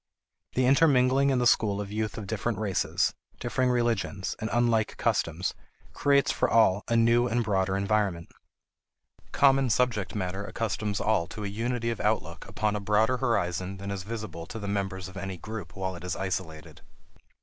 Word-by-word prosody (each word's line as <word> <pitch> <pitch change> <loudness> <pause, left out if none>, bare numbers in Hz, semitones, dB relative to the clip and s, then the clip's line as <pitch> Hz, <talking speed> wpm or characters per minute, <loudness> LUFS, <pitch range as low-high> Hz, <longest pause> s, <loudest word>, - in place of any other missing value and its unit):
The 130 - +3
intermingling 135 -1 +4
in 135 - +2
the 125 - +1
school 105 -4 +3
of 100 -1 -5
youth 110 -1 -2
of 110 - -5
different 110 +2 -2
races, 100 -3 0 0.3
differing 125 +1 0
religions, 115 -5 0
and 110 - -3
unlike 115 -3 +1
customs 85 +3 0 0.4
creates 140 -1 +3
for - - 0
all 105 -3 +4
a 115 - +1
new 115 +1 +4
and 120 0 0
broader 95 -2 0
environment. 100 -4 0 1.0
Common 135 -2 +4
subject 115 -5 0
matter 95 0 -3
accustoms 105 -1 -2
all 105 -6 +1
to 105 +2 -7
a - - -1
unity 115 +3 -2
of 115 - -4
outlook - - -1
upon 105 -1 -1
a - - -1
broader 110 +5 +2
horizon 95 -6 -1
than 100 +1 -5
is 100 -1 -3
visible 100 -5 -6
to 115 - -7
the 100 -2 -5
members 95 -2 -2
of 95 0 -11
any 95 -2 -5
group 110 +1 -7
while 95 -1 -3
it 85 - -10
is 90 -1 -3
isolated. 90 -5 -5
105 Hz, 170 wpm, -28 LUFS, 95-120 Hz, 1.0 s, intermingling